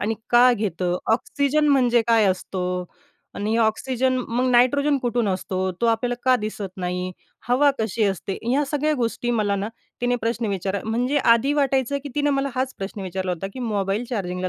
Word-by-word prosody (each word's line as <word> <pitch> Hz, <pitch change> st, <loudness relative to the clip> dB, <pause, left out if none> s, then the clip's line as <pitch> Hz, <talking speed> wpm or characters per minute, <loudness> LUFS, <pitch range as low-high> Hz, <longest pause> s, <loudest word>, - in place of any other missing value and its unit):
आणि 220 Hz, +2 st, 0 dB, 0.2 s
का 245 Hz, +1 st, +6 dB
घेतं? 180 Hz, -5 st, -1 dB, 0.2 s
ऑक्सिजन 285 Hz, +5 st, +1 dB
म्हणजे 245 Hz, -4 st, +4 dB
काय 225 Hz, -2 st, +4 dB
असतो 185 Hz, 0 st, -2 dB, 0.7 s
आणि 215 Hz, +3 st, -1 dB
ऑक्सिजन 255 Hz, +3 st, +1 dB
मग 250 Hz, +2 st, 0 dB
नायट्रोजन 280 Hz, +4 st, +3 dB
कुठून 240 Hz, -3 st, 0 dB
असतो? 185 Hz, 0 st, -2 dB
तो 235 Hz, -, +2 dB
आपल्याला 230 Hz, +2 st, +1 dB
का 255 Hz, 0 st, +5 dB
दिसत 205 Hz, -2 st, -5 dB
नाही? 180 Hz, 0 st, -3 dB, 0.4 s
हवा 280 Hz, +4 st, +4 dB
कशी 220 Hz, 0 st, 0 dB
असते?" 195 Hz, 0 st, -2 dB
ह्या 260 Hz, +5 st, +1 dB
सगळ्या 300 Hz, +1 st, +1 dB
गोष्टी 240 Hz, +1 st, -1 dB
मला 210 Hz, -3 st, +1 dB
ना, 200 Hz, +2 st, -2 dB, 0.3 s
तिने 245 Hz, 0 st, +1 dB
प्रश्न 230 Hz, 0 st, -2 dB
विचारा 195 Hz, 0 st, -2 dB
म्हणजे 245 Hz, +6 st, 0 dB, 0.2 s
आधी 270 Hz, +5 st, 0 dB
वाटायचं 275 Hz, 0 st, +1 dB
की -, -, -4 dB
तिने 290 Hz, 0 st, +1 dB
मला 275 Hz, 0 st, 0 dB
हाच 260 Hz, 0 st, -2 dB
प्रश्न 195 Hz, +1 st, -5 dB
विचारला 185 Hz, 0 st, -3 dB
होता 180 Hz, +2 st, -4 dB
की 260 Hz, -, -6 dB
मोबाईल 210 Hz, -1 st, -1 dB
चार्जिंगला 185 Hz, -5 st, -2 dB
230 Hz, 175 wpm, -23 LUFS, 195-255 Hz, 0.7 s, का